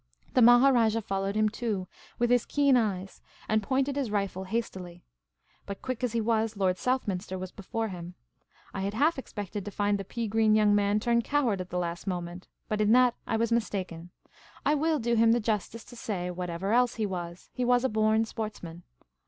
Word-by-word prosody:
The 255 - +4
Maharajah 240 -2 +5
followed 195 0 -2
him 215 0 +3
too, 210 -4 -3 0.3
with 240 0 +1
his 245 -2 +3
keen 280 -2 +3
eyes, 195 -5 -1 0.3
and 215 0 +2
pointed 270 +5 0
his 275 -5 -1
rifle 195 -2 -2
hastily. 185 -5 -4 0.6
But, 200 -1 -7
quick 255 -1 -4
as 245 -3 0
he 230 - +1
was. 220 -1 0
Lord 185 -2 +1
Southminster 200 -7 -1
was 185 0 -6
before 225 +3 -4
him. 175 -1 -8 0.6
I 195 - -3
had 200 +2 -2
half 295 +5 +2
expected 205 -5 -6
to 205 - -5
find 205 0 0
the - - -3
pea 230 +4 -4
green 215 0 +3
young 210 -1 +4
man 205 0 +2
turn 235 +1 +2
coward 240 -8 0
at 185 - -8
the 180 - -3
last 170 +1 -3
moment; 175 -1 -4 0.2
but 215 0 -1
in 210 +1 +4
that 250 -1 +5
I - - 0
was 230 +1 0
mistaken: 185 -7 -2 0.6
I 295 - +4
will 310 +1 +1
do 235 -2 -1
him 230 0 +5
the 240 - +2
justice 220 0 -2
to 245 - -14
say, 185 -6 -3
whatever 180 +3 -3
else 245 0 +3
he 220 - -1
was, 175 -3 -6
he 250 - -2
was 245 0 +3
a - - +3
born 220 0 +2
sportsman. 210 -7 -6
215 Hz, 200 wpm, -28 LUFS, 190-235 Hz, 0.6 s, Maharajah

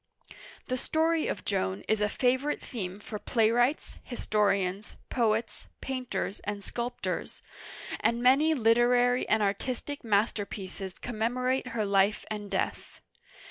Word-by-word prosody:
The 255 - -1
story 320 +4 +1
of - - -4
Joan 95 +2 -1
is 220 -1 +2
a 210 - +2
favorite 260 +5 +1
theme 195 -6 -5
for 210 0 -6
playwrights, 240 +6 +1
historians, 200 -4 0 0.2
poets, 225 -2 0
painters, 255 -6 -3
and 205 -1 -5
sculptors; 240 +4 -4 0.6
and 235 0 +1
many 275 +6 +5
literary 245 +1 +3
and 215 0 +3
artistic 255 +8 -2
masterpieces 200 -3 -1
commemorate 250 +3 -1
her 230 -3 -1
life 200 +1 +2
and 205 -1 -4
death. - - -3
230 Hz, 115 wpm, -29 LUFS, 205-250 Hz, 0.6 s, many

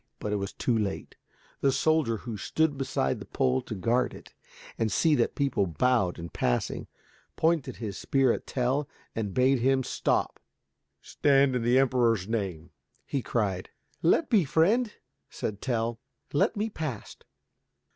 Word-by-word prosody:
But 105 - -3
it - - +1
was 100 0 -3
too 120 - 0
late. 105 -3 -3 0.4
The 135 - +3
soldier, 135 -4 +2
who 115 +1 -6
stood 155 +8 0
beside 135 - -1
the - - -8
pole 65 0 +1
to 110 - -6
guard 120 +6 +1
it - - -14 0.4
and 110 -2 -1
see 160 - +3
that - - +1
people 135 -9 +1
bowed 95 - +1
in 85 0 -7
passing, 60 -6 -1 0.5
pointed 165 -3 +1
his 100 -5 -5
spear 135 -3 +2
at - - -6
Tell 130 +3 0 0.3
and 105 -3 -2
bade 130 +4 +3
him 130 +2 +2
stop. - - -1 0.6
"Stand, 140 -2 +3
in 125 - 0
the 120 +2 +3
Emperor's 120 -7 +2
name," 95 -8 -3 0.3
he 140 - -2
cried. 100 -7 -1 0.3
"Let 290 - +3
be, 215 -7 +4
friend," 205 - +2 0.4
said 105 -1 -5
Tell, 115 -2 -1 0.3
"let 145 - +2
me 215 +2 -1
past." 150 - -6
125 Hz, 155 wpm, -28 LUFS, 105-140 Hz, 0.6 s, be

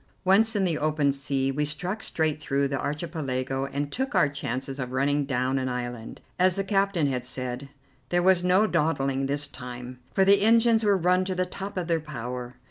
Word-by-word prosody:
Once 215 +4 +4
in 200 - +2
the 170 -4 0
open 150 -2 +2
sea, 135 0 -1
we 150 +2 -1
struck 180 +8 -2
straight 155 -2 -1
through 140 -1 0
the 135 -1 -2
Archipelago 140 -3 -3
and 140 +1 -3
took 265 +3 -2
our - - +5
chances 135 0 -4
of 125 -1 -4
running 145 +2 +1
down 130 0 0
an 130 0 -2
island, 120 -2 -5 0.2
as 185 -1 +4
the 195 - 0
captain 195 -4 +1
had 130 -3 -1
said. 130 +1 -5 0.4
There 175 0 +2
was 185 -1 +4
no 185 +4 +4
dawdling 135 -7 0
this 145 +1 +1
time, 125 -2 -8
for 195 - +3
the 200 0 +5
engines 225 +1 +4
were 205 -2 +4
run 180 +1 +2
to 185 0 -2
the 185 0 0
top 195 +2 -7
of 180 - -1
their 165 -1 +1
power. 125 -4 -6
145 Hz, 200 wpm, -26 LUFS, 135-185 Hz, 0.4 s, our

